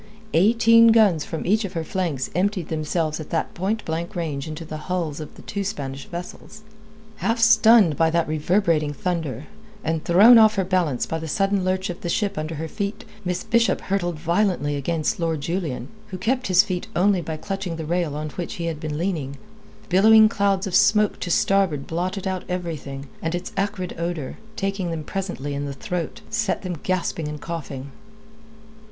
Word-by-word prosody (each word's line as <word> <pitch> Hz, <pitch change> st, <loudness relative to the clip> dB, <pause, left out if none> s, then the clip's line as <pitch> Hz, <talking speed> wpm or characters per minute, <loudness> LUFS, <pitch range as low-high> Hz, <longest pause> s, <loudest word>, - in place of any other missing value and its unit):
Eighteen 230 Hz, +5 st, +6 dB
guns 210 Hz, -9 st, +4 dB
from 160 Hz, -, -5 dB
each 215 Hz, +5 st, +2 dB
of 195 Hz, -, -5 dB
her 165 Hz, -, -2 dB
flanks 160 Hz, -6 st, -2 dB
emptied 185 Hz, -2 st, 0 dB
themselves 155 Hz, 0 st, -1 dB
at 155 Hz, -, -7 dB
that 165 Hz, -, -2 dB
point 205 Hz, +5 st, -2 dB
blank 170 Hz, +5 st, -3 dB
range 155 Hz, -4 st, -3 dB
into 155 Hz, +1 st, -6 dB
the 155 Hz, 0 st, -6 dB
hulls 170 Hz, -5 st, -2 dB
of 155 Hz, -, -8 dB
the -, -, -13 dB
two 200 Hz, -1 st, -3 dB
Spanish 135 Hz, -7 st, -5 dB
vessels. 180 Hz, +5 st, -8 dB, 0.5 s
Half 230 Hz, +2 st, 0 dB
stunned 225 Hz, -, +6 dB
by 165 Hz, 0 st, +3 dB
that 170 Hz, 0 st, +1 dB
reverberating 155 Hz, -1 st, +1 dB
thunder, 155 Hz, -5 st, -3 dB, 0.4 s
and 160 Hz, 0 st, -1 dB
thrown 215 Hz, +7 st, +8 dB
off 215 Hz, -1 st, +6 dB
her 195 Hz, -, +1 dB
balance 175 Hz, -9 st, +1 dB
by 160 Hz, -, -3 dB
the 160 Hz, -, -6 dB
sudden 195 Hz, +4 st, +1 dB
lurch 185 Hz, 0 st, 0 dB
of 175 Hz, -, -10 dB
the 175 Hz, -, -3 dB
ship 200 Hz, +2 st, 0 dB
under 155 Hz, 0 st, -4 dB
her 160 Hz, +2 st, -4 dB
feet, 200 Hz, +5 st, -4 dB, 0.2 s
Miss 180 Hz, 0 st, -2 dB
Bishop 235 Hz, 0 st, +2 dB
hurtled 175 Hz, -4 st, -2 dB
violently 170 Hz, -3 st, 0 dB
against 155 Hz, +4 st, -1 dB
Lord 165 Hz, -3 st, -1 dB
Julian, 155 Hz, -7 st, -3 dB, 0.2 s
who 190 Hz, -3 st, -6 dB
kept 250 Hz, +7 st, 0 dB
his 185 Hz, +1 st, +6 dB
feet 185 Hz, -4 st, -4 dB
only 190 Hz, 0 st, +3 dB
by 160 Hz, -1 st, -5 dB
clutching 195 Hz, 0 st, -4 dB
the 160 Hz, -1 st, -5 dB
rail 170 Hz, -2 st, -1 dB
on 150 Hz, 0 st, -4 dB
which 175 Hz, +2 st, -5 dB
he 170 Hz, -, -4 dB
had 165 Hz, -3 st, -3 dB
been 150 Hz, -1 st, -4 dB
leaning. 155 Hz, -6 st, -2 dB, 0.5 s
Billowing 215 Hz, +4 st, +7 dB
clouds 200 Hz, -3 st, +1 dB
of 190 Hz, -, -5 dB
smoke 210 Hz, +1 st, +4 dB
to 180 Hz, -, -4 dB
starboard 175 Hz, -5 st, +2 dB
blotted 185 Hz, +4 st, -3 dB
out 190 Hz, -1 st, -2 dB
everything, 155 Hz, -6 st, -5 dB
and 165 Hz, +1 st, -1 dB
its 175 Hz, -, -5 dB
acrid 195 Hz, -2 st, -2 dB
odour, 170 Hz, -5 st, -4 dB, 0.2 s
taking 195 Hz, -3 st, -2 dB
them 165 Hz, -2 st, -4 dB
presently 165 Hz, -6 st, -4 dB
in 140 Hz, 0 st, -3 dB
the 140 Hz, -, -4 dB
throat, 165 Hz, +4 st, -4 dB
set 225 Hz, -4 st, -1 dB
them 180 Hz, -4 st, -4 dB
gasping 175 Hz, -4 st, -1 dB
and 150 Hz, 0 st, -5 dB
coughing. 140 Hz, -5 st, -6 dB
175 Hz, 185 wpm, -23 LUFS, 155-195 Hz, 0.5 s, thrown